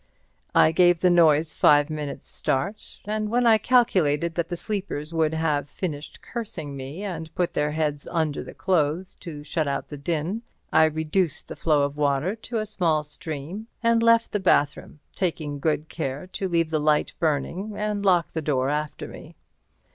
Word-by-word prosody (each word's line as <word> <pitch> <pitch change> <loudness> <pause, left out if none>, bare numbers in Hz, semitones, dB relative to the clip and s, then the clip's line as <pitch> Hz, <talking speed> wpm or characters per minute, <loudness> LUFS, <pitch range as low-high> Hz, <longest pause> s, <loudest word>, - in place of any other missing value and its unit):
I - - +6
gave 175 0 +4
the 180 - +5
noise 160 -2 +4
five 145 +1 +4
minutes' 150 -2 -5
start, 195 +11 -3
and 215 0 -2
when 245 +2 +2
I 225 -2 +6
calculated 180 - +2
that 170 0 -2
the 175 - -3
sleepers 170 -7 -4
would 160 -1 +1
have 150 -3 0
finished 155 -5 -6
cursing 165 - -6
me 140 +8 -6
and 165 -5 -5
put 180 -2 0
their 150 0 0
heads 150 -2 -1
under 160 -4 0
the - - -11
clothes 175 0 0
to 150 -4 -8
shut 155 0 -1
out 140 - -2
the 145 - -7
din, 165 +8 -2 0.3
I 160 - +7
reduced 160 +2 -1
the - - -6
flow 150 -3 +2
of 140 +1 -2
water 145 +6 +1
to 230 +1 -5
a 215 - -1
small 170 -7 +1
stream 155 +7 -7 0.2
and 230 0 +4
left 230 0 +4
the 210 - 0
bathroom, 145 -5 +1
taking 155 -5 -2
good 155 +1 0
care 145 -2 -4
to 195 - -2
leave 165 -2 +1
the 155 - +1
light 150 0 +2
burning 165 +7 -1
and 210 -1 -2
lock 180 -4 +3
the 160 - -3
door 135 -3 0
after 150 +1 -3
me. - - -11
160 Hz, 175 wpm, -25 LUFS, 150-190 Hz, 0.3 s, I